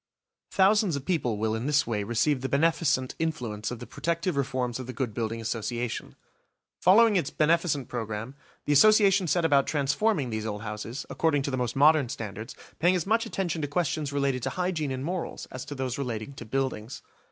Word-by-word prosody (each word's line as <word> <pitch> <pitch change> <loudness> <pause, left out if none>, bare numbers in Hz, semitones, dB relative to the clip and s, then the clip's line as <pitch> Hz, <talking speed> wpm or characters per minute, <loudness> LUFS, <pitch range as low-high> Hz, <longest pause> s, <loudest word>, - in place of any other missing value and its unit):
Thousands 200 -2 +3
of 140 -1 -5
people 125 - 0
will 110 +1 0
in 115 +4 -2
this 145 -1 +3
way 110 -3 -1
receive 120 +6 +1
the 135 - -2
beneficent 140 -2 +1
influence 125 -10 -2
of 125 - -5
the 120 - -8
protective 170 +4 -2
reforms 130 -3 -1
of 130 - -6
the 130 - -5
Good 125 -3 -3
Building 115 +1 -3
Association. 115 +1 -3 0.6
Following 210 +3 +6
its 155 -6 0
beneficent 155 -3 +1
programme, 115 +1 -4 0.3
the 145 - +2
Association 200 +2 +5
set 170 +1 +2
about 140 -3 +3
transforming 145 - +1
these 110 0 -3
old 105 0 -4
houses, 110 +4 -5
according 145 -4 +1
to 140 - -2
the - - 0
most 125 -2 -2
modern 145 -2 +5
standards, 110 +2 -6 0.2
paying 175 +3 +4
as 175 - -1
much 225 +3 +1
attention 175 -6 -2
to 145 - -1
questions 150 -1 -1
related 140 -2 0
to - - -1
hygiene 180 -5 -1
and 130 +1 -3
morals 180 +1 -4
as 130 0 -6
to 145 - -7
those 130 -1 -3
relating 120 -1 -4
to 120 - -9
buildings. 125 -2 -3
140 Hz, 190 wpm, -27 LUFS, 120-165 Hz, 0.6 s, Following